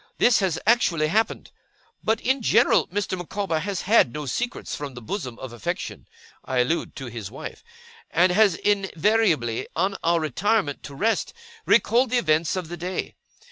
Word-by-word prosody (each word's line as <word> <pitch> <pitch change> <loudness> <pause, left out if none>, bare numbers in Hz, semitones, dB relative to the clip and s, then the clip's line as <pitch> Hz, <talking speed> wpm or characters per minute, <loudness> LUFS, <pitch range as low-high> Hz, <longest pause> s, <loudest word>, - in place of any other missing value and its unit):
This 240 - +4
has 185 -5 0
actually 175 -9 +3
happened. 220 +5 0 0.5
But, 220 +1 +1
in 265 +1 +1
general, - - +4
Mr. 200 0 -2
Micawber 180 -1 -2
has 195 +2 -3
had 200 - +4
no 150 +3 -5
secrets 240 - -3
from 140 -3 -6
the - - -7
bosom 125 - -5
of 130 -2 -8
affection 120 - -5 0.4
I 130 - -3
allude 160 +8 -1
to 135 - -6
his 115 -5 -6
wife 130 - -9 0.5
and 180 +2 +3
has 200 -1 +4
invariably, 195 - +1
on 190 +4 0
our 170 0 +3
retirement 160 - 0
to 140 - -9
rest, 225 - 0 0.3
recalled 235 +4 +4
the 250 - +2
events 160 -6 +1
of 185 -3 -3
the 175 +2 -7
day. 180 +2 -4
180 Hz, 165 wpm, -24 LUFS, 150-210 Hz, 0.5 s, This